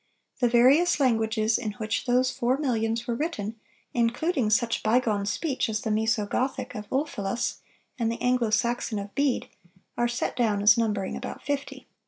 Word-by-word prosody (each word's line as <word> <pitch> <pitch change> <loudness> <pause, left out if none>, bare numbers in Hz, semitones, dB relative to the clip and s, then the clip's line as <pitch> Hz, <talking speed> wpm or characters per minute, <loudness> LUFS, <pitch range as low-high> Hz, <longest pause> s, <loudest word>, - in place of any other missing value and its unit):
The 245 -2 +3
various 270 +9 +5
languages 220 -3 +2
in 215 -4 -3
which 220 +2 -3
those 250 +1 +3
four 250 +2 0
millions 230 -4 -1
were 240 - -1
written, 230 -6 -3 0.3
including 240 +2 +1
such 230 +2 +1
bygone 215 -3 +1
speech 265 +4 -1
as 215 -1 -2
the 220 - -2
Mœso 220 0 +1
Gothic 260 +5 -2
of 210 -3 -7
Ulfilas 245 -6 -2 0.4
and 230 -1 +1
the 230 - -5
Anglo 250 -2 +1
Saxon 230 +1 0
of 200 0 -6
Bede, 280 -3 0 0.5
are 240 - +3
set 240 0 -2
down 215 -4 +1
as 210 0 +7
numbering 210 -4 -1
about - - -7
fifty." 285 0 -4
235 Hz, 165 wpm, -26 LUFS, 215-255 Hz, 0.5 s, as